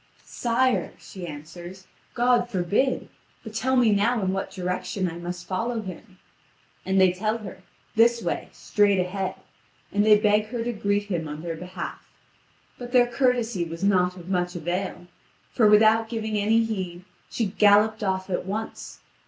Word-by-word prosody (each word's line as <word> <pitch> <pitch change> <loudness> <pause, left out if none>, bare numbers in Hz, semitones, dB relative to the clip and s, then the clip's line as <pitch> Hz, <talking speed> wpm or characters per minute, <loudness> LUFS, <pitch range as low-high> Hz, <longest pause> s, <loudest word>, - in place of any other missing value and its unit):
"Sire," 245 +1 0
she 185 -3 -9
answers, 175 +5 -9 0.3
"God 240 0 +3
forbid. 210 +7 0 0.4
But 220 - -9
tell 260 +4 0
me 240 -4 +4
now 215 +4 +2
in 190 0 0
what 195 0 -3
direction 185 +1 -3
I 170 0 -6
must 175 0 -6
follow 225 +4 -2
him." 190 +1 -10 0.7
And 190 0 +2
they 185 -1 +5
tell 215 +4 -1
her: 195 -4 -10 0.3
"This 235 +1 +5
way, - - -3
straight 205 -2 +2
ahead," 185 +1 -2 0.6
and 205 - +2
they 210 0 +7
beg 210 0 +2
her 230 0 -3
to 240 +1 -2
greet 205 -1 0
him 175 -6 -3
on 150 +2 -7
their 170 -1 -3
behalf. 180 +1 -7 0.8
But 245 0 -8
their 245 -1 +6
courtesy 240 -5 0
was 165 +2 -6
not 180 -2 +3
of 175 -1 -11
much 180 -1 -1
avail; 175 +2 -3 0.5
for, 220 - +4
without 220 +1 +5
giving 220 -2 -3
any 220 +2 +3
heed, 185 -5 -4 0.2
she 230 - -1
galloped 210 +2 +4
off 190 -1 -1
at 180 - -1
once. 215 +3 -5
205 Hz, 160 wpm, -25 LUFS, 180-225 Hz, 0.8 s, they